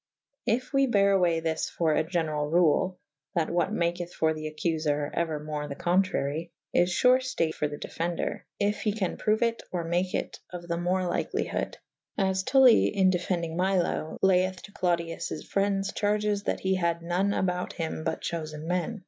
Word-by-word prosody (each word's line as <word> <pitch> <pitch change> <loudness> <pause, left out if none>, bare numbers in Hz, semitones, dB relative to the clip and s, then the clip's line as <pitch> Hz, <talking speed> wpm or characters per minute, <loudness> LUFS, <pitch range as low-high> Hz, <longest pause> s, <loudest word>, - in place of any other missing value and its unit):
If 255 +5 0
we 275 0 +4
bere 200 -4 +4
away 175 -4 +3
this 160 -1 -1
for 160 -2 +1
a 155 - +2
generall 155 -3 -1
rule 180 +2 +3 0.4
(that 165 -2 +1
what 175 +3 +1
maketh 175 -2 -1
for 160 0 +2
the 155 0 -5
accuier, 155 -2 -1
euermore 150 -2 -2
the 140 - -5
contrary) 170 -3 0 0.2
is 175 +1 +3
fure 255 0 +6
itaye 255 -11 -1
for 150 - -1
the 145 0 -6
defender 170 +3 -3
/ - - -61
yf 205 0 +1
he 210 - 0
can 200 -4 -2
proue 215 0 +1
it 230 0 0
/ - - -44
or 175 -2 -2
make 175 +2 0
it - - -3
of 175 -1 -8
the 170 0 -1
more 180 +2 0
lykelyhode. 175 -1 -2 0.4
As 190 -1 +1
Tully 255 +2 +6
in 190 -2 +3
defendynge 170 -2 -1
Milo 180 -3 0
/ - - -57
layeth 185 -1 +3
to 205 - -11
Clodius 170 -3 -1 0.2
frendes 195 0 0
charges 210 0 0
that - - -1
he 190 0 +1
had 170 -2 0
none 180 +4 +1
about 180 -2 -1
hym 160 -1 -4
but 160 0 -2
chofe« 155 -2 -4
me«. 180 +7 -2
175 Hz, 180 wpm, -28 LUFS, 165-195 Hz, 0.4 s, fure